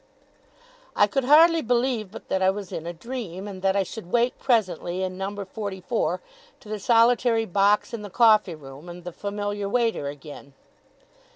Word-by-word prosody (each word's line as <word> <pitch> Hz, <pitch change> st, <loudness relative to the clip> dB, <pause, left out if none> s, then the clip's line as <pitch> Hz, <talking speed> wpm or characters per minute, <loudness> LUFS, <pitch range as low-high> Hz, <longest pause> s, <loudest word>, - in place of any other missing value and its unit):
I -, -, +5 dB
could 255 Hz, +5 st, -1 dB
hardly 325 Hz, +4 st, +6 dB
believe 240 Hz, -3 st, 0 dB
but 205 Hz, -, -11 dB
that 190 Hz, -, 0 dB
I 190 Hz, -, +4 dB
was 195 Hz, -1 st, -4 dB
in 165 Hz, -, -5 dB
a -, -, -2 dB
dream, 195 Hz, 0 st, -6 dB
and 190 Hz, -2 st, -8 dB
that 195 Hz, 0 st, +2 dB
I 200 Hz, -, +2 dB
should 190 Hz, -2 st, -9 dB
wake 240 Hz, +1 st, +1 dB
presently 185 Hz, -, 0 dB
in 185 Hz, 0 st, -3 dB
number 195 Hz, +1 st, -4 dB
forty 200 Hz, -1 st, -6 dB
four, 225 Hz, +6 st, -1 dB, 0.4 s
to -, -, -17 dB
the 215 Hz, 0 st, -4 dB
solitary 230 Hz, 0 st, +3 dB
box 200 Hz, +3 st, +2 dB
in 230 Hz, -, -4 dB
the 205 Hz, -, -8 dB
coffee 215 Hz, -5 st, +4 dB
room 140 Hz, +2 st, -12 dB
and 175 Hz, 0 st, -9 dB
the 180 Hz, -, -6 dB
familiar 205 Hz, 0 st, -3 dB
waiter 225 Hz, -9 st, 0 dB
again. 140 Hz, 0 st, -10 dB
205 Hz, 180 wpm, -25 LUFS, 185-230 Hz, 0.4 s, hardly